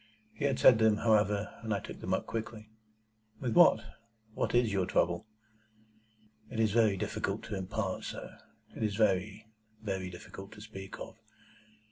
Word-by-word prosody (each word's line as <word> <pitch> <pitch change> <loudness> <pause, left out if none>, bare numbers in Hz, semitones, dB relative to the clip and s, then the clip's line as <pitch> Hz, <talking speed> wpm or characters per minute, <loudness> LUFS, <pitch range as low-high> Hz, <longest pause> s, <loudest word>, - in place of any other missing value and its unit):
He 145 - -3
had 135 -2 +1
said 120 -3 +7
them, 110 -1 +4
however, 105 -2 +2
and 110 -1 -4
I 100 - +1
took - - -9
them - - -4
up - - -4
quickly. 110 -1 -6 0.7
"With 125 -3 -1
what? 175 -10 +7 0.5
What - - -1
is 120 -4 +3
your 95 -2 +1
trouble?" 85 +3 +1 1.2
"It 110 - -5
is 110 -2 +3
very 110 -3 +3
difficult - - -2
to 105 - -5
impart, 95 +1 -3
sir. - - -7 0.4
It - - -7
is 105 -2 0
very, 105 0 +1 0.3
very 95 -4 -3
difficult 95 +3 -10
to 105 - -12
speak 95 -3 -9
of. - - -9
105 Hz, 160 wpm, -31 LUFS, 95-110 Hz, 1.2 s, said